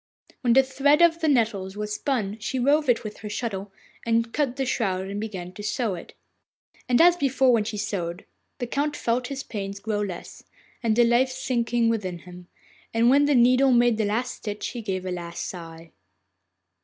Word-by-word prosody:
When 240 -2 +3
the 265 +2 +6
thread 275 +3 +2
of 335 -1 +4
the 320 - 0
nettles 215 -8 +1
was 210 0 -3
spun 220 -5 -2
she 220 +5 -3
wove 285 +3 +2
it 240 - +3
with 215 -1 -7
her 210 - -7
shuttle, 205 -3 -4 0.3
and 230 0 +2
then 230 - -20
cut 280 -3 -1
the 270 - -1
shroud 190 -7 -1
and 200 +1 -4
began 190 -5 -6
to 205 - -9
sew 215 0 -1
it. 175 - -9 0.7
And 245 - +4
as 350 +1 +7
before, 270 -5 +2
when 220 -3 +2
she 215 -1 -4
sewed 180 -4 -3 0.3
the 245 - -3
Count 290 +4 -1
felt 245 0 -1
his 275 0 -5
pains 200 -2 -5
grow 210 0 -2
less, 190 -4 -6 0.4
and 225 -2 +1
the 240 - +5
life 240 +2 +3
sinking 240 -2 0
within 200 -6 -1
him, 180 +1 -13 0.5
and 230 +2 +4
when 285 +2 +5
the 290 -1 +3
needle 255 +2 +5
made 240 -2 +3
the 215 - +2
last 235 +5 -1
stitch 210 -1 -5
he 240 - -6
gave 190 -4 -3
his 185 -1 -3
last 170 -1 -5
sigh. 165 -2 -9
230 Hz, 200 wpm, -25 LUFS, 200-255 Hz, 0.7 s, as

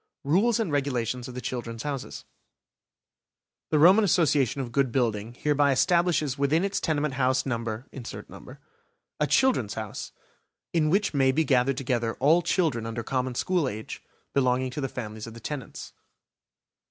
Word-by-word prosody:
RULES 200 +11 +2
AND 210 -8 -1
REGULATIONS 125 -4 -1
OF 125 - -9
THE 125 - -5
"CHILDREN'S 115 -3 -5
HOUSES" 140 -3 -5 1.4
The 155 - +2
Roman 185 +8 +7
Association 150 - +2
of 125 -3 -4
Good 135 -1 +1
Building 115 -2 -1
hereby 145 0 +2
establishes 155 0 +2
within 150 +5 +2
its 200 0 -1
tenement 150 -2 -1
house 130 0 +1
number, 115 -2 -3 1.3
a 150 - +2
"Children's 220 - +2
House", 110 -2 -6 0.6
in 155 -3 +2
which 195 +3 +1
may 135 -2 +3
be 160 +5 +2
gathered 130 -2 +2
together 120 -4 -1
all 155 +6 +4
children 155 - 0
under 115 0 -4
common 130 +1 -2
school 175 +1 +1
age, 110 0 -7 0.3
belonging 130 -1 +1
to 145 - -4
the 135 - -2
families 110 -3 -6
of 115 - -10
the - - -9
tenants. 135 +3 -7
135 Hz, 150 wpm, -26 LUFS, 120-155 Hz, 1.4 s, Roman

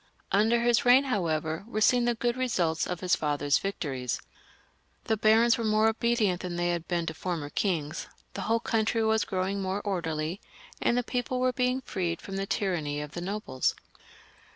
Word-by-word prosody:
Under 220 +4 +3
his 235 -1 +3
reign, 250 +2 +6
however, 160 - -1
were 215 -2 -3
seen 245 +3 +4
the 240 0 +1
good 240 +1 0
results 180 -11 0
of 180 -1 -4
his 180 -1 +3
father's 145 -1 +1
victories. 135 -10 -3 0.8
The 220 - +1
barons 225 +2 +4
were - - -1
more 215 0 +3
obedient 220 -5 +1
than 180 -1 -4
they 175 0 0
had 170 -1 -3
been 170 -2 -1
to 160 - -3
former 160 -3 -4
kings, 165 -5 -1 0.3
the - - -5
whole 230 +1 +1
country 225 0 +1
was 220 0 +2
growing 195 +1 -1
more 190 +1 -1
orderly, 170 -3 -2 0.4
and 235 - +2
the 245 - +1
people 250 +1 -2
were 255 0 +2
being 250 +1 0
freed 175 -8 -2
from 195 - -7
the 195 0 -2
tyranny 170 -9 -1
of 150 -1 -6
the 175 - -6
nobles. 185 -9 -1
195 Hz, 180 wpm, -28 LUFS, 170-230 Hz, 0.8 s, reign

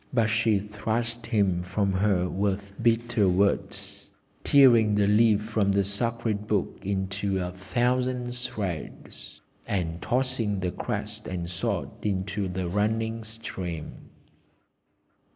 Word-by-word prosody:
But 115 -4 +2
she 110 -1 +3
thrust 110 +3 -3
him 100 -6 +2
from 95 +2 0
her 95 -1 +2
with 100 +1 -2
bitter 115 -3 +2
words, 100 +3 -1 0.3
tearing 120 -7 +6
the 105 -1 +3
leaf 105 0 +4
from 105 -2 +1
the 100 0 +3
sacred 105 +1 -2
Book 105 -4 -1
into 95 0 -1
a 90 -1 -2
thousand 125 +5 -1
shreds, 100 - -6 0.3
and 85 -4 -2
tossing 125 -5 0
the 90 0 -1
crest - - -4
and 90 -2 -4
sword 85 - -2
into 100 0 -1
the 90 0 -3
running 110 +4 0
stream. 95 -7 -6
105 Hz, 115 wpm, -27 LUFS, 95-115 Hz, 0.3 s, tearing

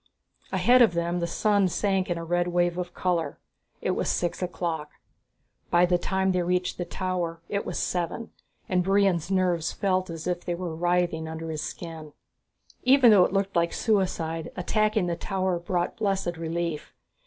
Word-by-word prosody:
Ahead 250 +1 +5
of 220 -8 +5
them 170 +1 0
the 170 - -1
sun 205 0 +2
sank 190 +1 0
in 175 - 0
a 165 - -5
red 175 +1 +1
wave 175 0 +1
of 180 0 -4
color. 170 -5 -1 0.4
It - - 0
was - - -1
six 175 +1 -1
o'clock. 165 -4 -3 0.8
By 175 +1 +5
the 175 0 +2
time 190 +1 0
they 180 -1 +1
reached 180 +1 -1
the 175 - -1
tower 175 -2 -3
it 200 0 -2
was - - -3
seven, 180 +6 -2 0.4
and 180 -1 +1
Brion's 190 -3 +2
nerves 180 -4 +1
felt 185 -2 0
as 165 -1 -6
if 180 -1 -2
they 175 - -2
were 170 -2 -4
writhing 175 -1 0
under 160 0 -5
his 155 -1 -3
skin. 160 -3 -7 0.7
Even 255 -2 +6
though 190 -4 +7
it - - -2
looked 195 0 -1
like 170 0 +2
suicide, 175 -7 0
attacking 215 +2 +1
the 170 -1 -1
tower 185 0 -1
brought 175 0 -2
blessed 195 -5 -1
relief. 165 -1 -4
175 Hz, 175 wpm, -26 LUFS, 170-190 Hz, 0.8 s, though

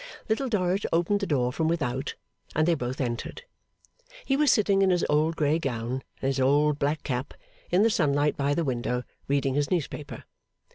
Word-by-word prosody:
Little 250 +4 0
Dorrit 190 -2 0
opened 175 +5 +2
the 200 - -2
door 125 -4 +1
from 160 +3 0
without, 140 -5 -1 0.4
and 155 +1 +2
they 175 - +4
both 125 -4 -3
entered. 125 - -3 0.8
He 270 - +2
was 290 -1 +4
sitting 200 -2 +3
in 195 - +4
his 180 -2 +2
old 155 +2 +2
grey 155 +1 +1
gown 125 -2 -3 0.2
and - - +1
his 135 0 0
old 145 +3 +3
black 145 +2 0
cap, 130 0 -3 0.3
in 180 +4 +4
the 225 - +5
sunlight 145 -4 +2
by 140 +1 0
the 170 - 0
window, 125 -1 -1 0.2
reading 140 -1 +1
his 145 0 0
newspaper. 150 -4 -3
150 Hz, 185 wpm, -27 LUFS, 135-175 Hz, 0.8 s, the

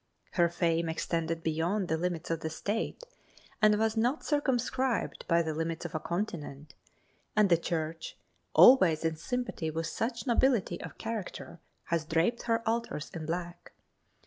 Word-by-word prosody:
Her 170 -2 +3
fame 165 -1 0
extended 165 0 -2
beyond 170 +5 0
the 160 - +1
limits 170 -1 -2
of 165 - 0
the 160 - -3
State 205 - -3 0.6
and 210 -1 +5
was 220 +1 +1
not 245 +7 0
circumscribed 265 -3 0
by 170 0 +3
the 160 -1 -2
limits 165 +2 -3
of 170 - -5
a 155 - -1
continent, 155 -6 -4 0.6
and 210 -3 +4
the 170 - +7
Church, 165 -1 -4 0.4
always 175 -12 +7
in 160 0 +1
sympathy 245 -3 -3
with 165 +1 -3
such 230 - -3
nobility 240 -7 +2
of - - -8
character, 220 -6 -5 0.2
has 170 -2 -1
draped 165 +9 +1
her 230 0 +1
altars 230 -9 -2
in 160 -2 -5
black. 175 +1 -5
170 Hz, 150 wpm, -30 LUFS, 160-225 Hz, 0.6 s, the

